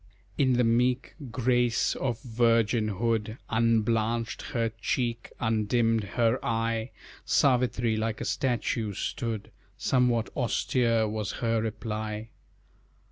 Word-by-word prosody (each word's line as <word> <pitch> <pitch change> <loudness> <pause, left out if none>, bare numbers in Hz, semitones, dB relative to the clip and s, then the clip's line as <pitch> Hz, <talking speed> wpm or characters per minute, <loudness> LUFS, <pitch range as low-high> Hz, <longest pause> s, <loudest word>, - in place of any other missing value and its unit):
In 130 -2 +3
the 125 0 +3
meek 125 +3 +1 0.2
grace 120 0 +2
of 120 -4 -2
virginhood 115 -2 +1
Unblanched 115 +1 +1
her 115 -2 0
cheek, 120 -1 -1
undimmed 115 0 +1
her 115 +1 +2
eye, 115 +1 -1 0.3
Savitri, 120 -4 +2
like 110 0 -2
a 120 - -4
statue, 115 -5 -1
stood, 115 0 -3 0.3
Somewhat 125 -3 +1
austere 120 -4 +1
was 105 -1 -3
her 115 -1 0
reply. 110 0 -4
115 Hz, 100 wpm, -28 LUFS, 110-120 Hz, 0.3 s, In